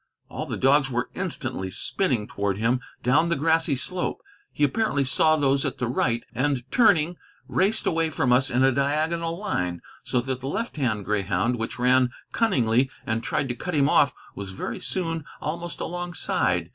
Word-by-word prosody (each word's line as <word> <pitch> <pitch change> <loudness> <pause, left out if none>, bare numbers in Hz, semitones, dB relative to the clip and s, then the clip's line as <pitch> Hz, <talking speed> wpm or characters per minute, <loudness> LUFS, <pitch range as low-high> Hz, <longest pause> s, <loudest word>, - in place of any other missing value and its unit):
All - - -5
the - - -3
dogs 135 +1 +4
were 125 -1 -2
instantly 130 - -2
spinning 125 - 0
toward 100 -1 -2
him 115 +4 +1 0.2
down 150 +7 +3
the 170 - +2
grassy 160 0 +2
slope. 180 +7 -3 0.3
He - - -2
apparently 145 -1 +2
saw 155 +4 +3
those 140 -2 +2
at 140 -2 -2
the 125 -1 -1
right, 120 -1 0
and, 130 +1 0
turning, 180 -8 +4 0.3
raced 205 +4 +1
away 165 -1 +1
from 130 -4 +1
us 130 +2 +4
in 125 +2 +2
a 135 - +5
diagonal 155 +5 0
line, 90 - -2 0.2
so 125 - 0
that 130 0 -3
the 130 - -6
left 225 - -3
hand 110 -8 -1
greyhound, 105 +3 0
which 115 - -4
ran 125 0 +4 0.2
cunningly 130 - +2 0.2
and 110 0 -1
tried 135 - -1
to 125 - -2
cut 180 +6 -4
him 140 -1 +4
off, 140 -1 +4 0.2
was 100 -1 -7
very - - -5
soon 165 -4 -2 0.2
almost 170 +3 -4
alongside. 175 -1 -1
135 Hz, 175 wpm, -25 LUFS, 120-165 Hz, 0.3 s, a